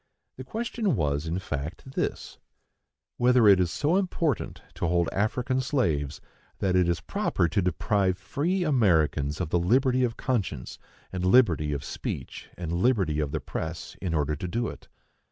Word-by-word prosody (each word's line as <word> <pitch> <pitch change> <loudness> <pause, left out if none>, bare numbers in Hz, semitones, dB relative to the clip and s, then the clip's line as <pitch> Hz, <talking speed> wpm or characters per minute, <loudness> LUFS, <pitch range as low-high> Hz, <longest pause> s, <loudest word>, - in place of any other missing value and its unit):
The 130 - -6
question 220 - -1
was, 75 -3 0
in 85 +2 -1
fact, 80 - -5
this,—whether 125 -2 -2
it 100 -2 +7
is 90 -2 +2
so 150 - +1
important 170 - -1
to 85 - -2
hold 85 0 +2
African 125 +5 0
slaves 80 - 0 0.4
that 95 -2 0
it 90 -1 +3
is 85 - 0
proper 85 - 0
to 100 - +1
deprive 95 +1 +1
free 170 - -1
Americans 80 - +2
of 90 -4 -2
the 90 - +3
liberty 130 +7 +3
of 120 -2 -1
conscience, 100 - -2 0.3
and 90 -1 -3
liberty 90 -8 +4
of 70 -1 -3
speech, - - -6
and 85 -2 -4
liberty 90 -5 +2
of 75 -2 0
the - - -1
press, 80 +1 -5
in 85 -3 -1
order 75 0 0
to 90 - -5
do 115 +4 -1
it. - - -11
95 Hz, 160 wpm, -27 LUFS, 80-130 Hz, 0.4 s, it